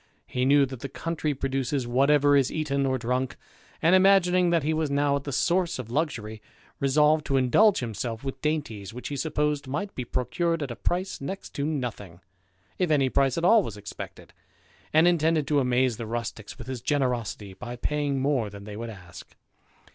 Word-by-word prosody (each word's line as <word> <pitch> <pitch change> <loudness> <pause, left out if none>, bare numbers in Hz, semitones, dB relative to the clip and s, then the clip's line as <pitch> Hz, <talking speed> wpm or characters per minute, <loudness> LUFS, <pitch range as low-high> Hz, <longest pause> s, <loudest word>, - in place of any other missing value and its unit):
He 125 0 -1
knew 140 +1 +5
that 130 -2 -8
the 135 - -6
country 155 0 -3
produces 135 0 -1
whatever 145 +4 +4
is 135 -2 +3
eaten 140 -3 0
or 130 0 +1
drunk, 125 +1 -1 0.5
and, 165 +3 +5
imagining 185 -2 +5
that 170 -3 +2
he 155 +2 +1
was 155 -1 0
now 140 0 +2
at 140 - -4
the 145 - -3
source 175 +5 +1
ol 130 - -4
luxury, 115 -7 -2 0.4
resolved 150 +3 +3
to 135 - +2
indulge 160 - +4
himself 115 0 -4
with 135 -1 -5
dainties 115 -10 -3
which 125 -1 -6
he 145 - -4
supposed 150 -1 -1
might 170 +10 -3
be 125 - -4
procured 165 +7 -1
at 135 - -5
a - - -5
price 180 +5 -2
next 190 +8 -6
to 140 +1 -2
nothing, 115 - -4 0.6
if 180 -3 +1
any 140 -4 +3
price 135 +1 +2
at 165 - 0
all 225 +4 +6
was 110 - -6
expected; 105 0 -9 0.6
and 160 +3 +5
intended 160 -3 +2
to 145 +1 +2
amaze 125 -2 +1
the 115 - -5
rusticks 115 -2 -5
with 120 - -9
his 130 -2 -5
generosity, 120 -8 -1
by 120 +5 -7
paying 145 +1 -1
more 130 -5 +1
than 100 0 -10
they 105 0 -8
would 115 +2 -5
ask. 90 -6 -12
140 Hz, 190 wpm, -26 LUFS, 120-155 Hz, 0.6 s, all